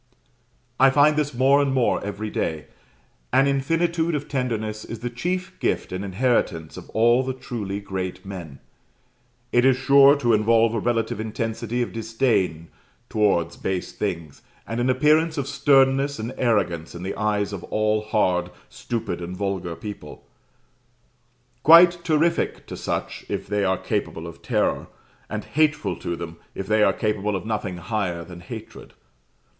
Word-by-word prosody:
I 135 +1 +7
find 145 +2 +4
this 150 -1 0
more 135 +3 +4
and 140 -1 +1
more 130 -2 +1
every 105 +1 -4
day: 80 -1 -2 0.7
an 135 - +4
infinitude 165 +4 +1
of 145 0 -4
tenderness 110 -5 -2
is 115 -1 -8
the 120 0 -3
chief 180 +9 -3
gift - - -1
and 95 +1 -4
inheritance 95 -6 0
of - - -10
all 120 +3 +4
the 130 0 -3
truly 105 -6 -5
great 95 -2 -5
men. 85 -8 -8 0.9
It 120 - +3
is 130 -1 +4
sure 140 +1 +6
to 120 -5 +1
involve 115 +1 +3
a 115 - 0
relative 115 -1 -1
intensity 115 +2 -2
of - - -6
disdain 110 -8 0 0.4
towards 90 -6 +1
base 95 -1 -3
things, 80 -4 -4 0.2
and 115 +1 -4
an 125 +2 +1
appearance 155 +5 +3
of 140 -1 -2
sternness 140 0 +3
and 115 +3 -5
arrogance 95 -11 0
in 85 - -7
the 95 - -3
eyes 105 -1 -1
of 95 - -6
all 110 0 +1
hard, 90 -5 +1 0.2
stupid, 110 -7 -4
and 90 +2 -6
vulgar 95 -4 -3
people 100 -8 -9 1.4
quite 170 +3 +7
terrific 165 +1 +1
to - - -7
such, - - -4
if - - -3
they 105 0 -1
are 95 -1 +1
capable 80 - -3
of 85 - -10
terror, - - 0 0.4
and 105 0 -4
hateful 150 - +1
to 85 - -4
them, 85 0 -7 0.2
if 95 - -4
they 105 +2 +2
are - - +5
capable 105 -1 -1
of 95 - -4
nothing 105 -5 -3
higher 90 -3 -2
than 90 -2 -10
hatred. 90 - -10
110 Hz, 155 wpm, -23 LUFS, 95-135 Hz, 1.4 s, I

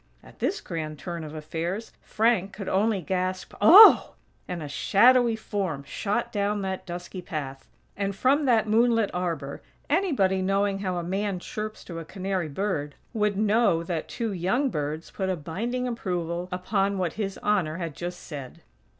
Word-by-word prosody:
At - - -17
this 410 - -1
grand 155 -3 -5
turn 170 0 -6
of 155 0 -8
affairs, 165 +7 -4
Frank 215 -4 +1
could 200 -2 -7
only 200 0 +1
gasp: 185 +1 -2
"OH 385 - +11
H - - -4
H!!" - - -15 0.4
and 175 -3 -4
a - - -5
shadowy 235 - +4
form 195 -9 -3
shot 205 +11 -2
down 205 0 0
that 190 -1 -4
dusky 175 +1 -6
path; 140 -6 -6 0.3
and 200 -1 -2
from 275 +7 +2
that 230 -4 +3
moonlit 225 -1 +3
arbor, 170 -6 -3 0.3
anybody 270 - +2
knowing 195 +1 +1
how 185 -2 -2
a 175 - -2
man 195 +2 -1
chirps 215 +4 -6
to 170 -2 -7
a - - -6
canary 185 0 -3
bird, 150 -4 -2 0.2
would 210 -3 0
know 210 -5 +3
that 170 -2 -3
two 230 -4 -3
young 240 +10 0
birds 150 +2 -4
put 190 -1 -2
a 185 - +1
binding 230 +11 -3
approval 180 -6 -3
upon 195 +2 0
what 180 -3 -1
His 200 -3 -3
Honor 180 -7 +1
had 165 -5 -5
just 175 +1 -6
said!! 140 -5 -9
190 Hz, 170 wpm, -26 LUFS, 170-215 Hz, 0.4 s, OH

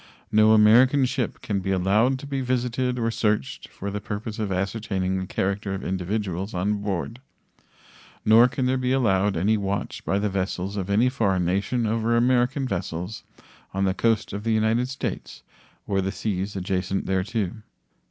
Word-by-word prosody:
No 110 0 +5
American 125 +6 +6
ship 125 -1 -2
can 100 -2 -1
be 95 - -4
allowed 100 +8 +2
to 135 - -9
be 140 -1 -3
visited 125 0 -1
or 115 -1 0
searched 105 - -1
for 100 +1 -6
the 105 +1 -4
purpose 110 +1 -5
of 105 -3 -2
ascertaining 95 -1 -1
the 95 - -4
character 100 +1 -2
of 95 - -6
individuals 95 +1 -3
on 100 +3 0
board, 100 +4 -3 1.1
nor 115 +3 +7
can 130 +1 -2
there 130 +1 +1
be 125 0 0
allowed 105 -7 +2
any 105 +6 +2
watch 100 0 -3
by 100 - 0
the 105 +1 0
vessels 95 0 -2
of 100 -2 -3
any 110 +5 +3
foreign 100 -9 +1
nation 100 +7 0
over 115 +1 +1
American 125 +2 +2
vessels 90 0 -4 0.5
on 95 0 +1
the 95 - +1
coast 115 0 0
of 100 +1 -4
the 115 0 +1
United 110 +3 +1
States 135 - -5 0.4
or 95 -1 0
the 95 +1 -2
seas 100 -1 -3
adjacent 95 0 -2
thereto. 95 +1 -1
105 Hz, 170 wpm, -24 LUFS, 95-115 Hz, 1.1 s, nor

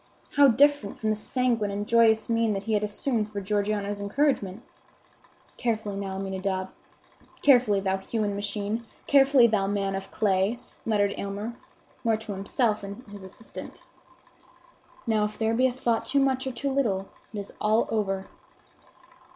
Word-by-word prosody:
How 285 0 +7
different 280 -3 +3
from 220 -1 0
the - - +1
sanguine 230 -1 0
and 205 +1 -3
joyous 225 -1 +4
mien 230 -2 +2
that 195 0 -3
he 220 - -2
had 210 0 +2
assumed 215 +1 -1
for 205 -1 -4
Georgiana's 205 0 -1
encouragement! 210 -2 0 0.9
"Carefully 220 -4 -1
now, 195 -1 -4
Aminadab; 190 -1 -2 0.7
carefully, 245 -8 +5
thou 190 0 0
human 205 +1 -2
machine; 205 +3 -3 0.2
carefully, 275 -3 +6
thou 210 -4 +2
man 200 -1 -1
of 195 0 -5
clay!" 200 +2 +1 0.3
muttered 205 -2 +2
Aylmer, 205 +4 -4 0.5
more 225 -2 +2
to 220 -1 -7
himself 210 +3 0
than 200 +4 -8
his 205 -2 -9
assistant. 190 +4 -9 1.2
"Now, 220 -3 +2
if 210 0 -3
there 225 0 +1
be 255 +3 +4
a - - -1
thought 240 -2 -1
too 280 - +2
much 265 -1 +1
or - - -1
too 275 +2 -3
little, 205 -8 0 0.2
it 215 - -7
is 200 -1 -6
all 215 +2 +3
over." 195 -3 -1
210 Hz, 155 wpm, -27 LUFS, 200-235 Hz, 1.2 s, How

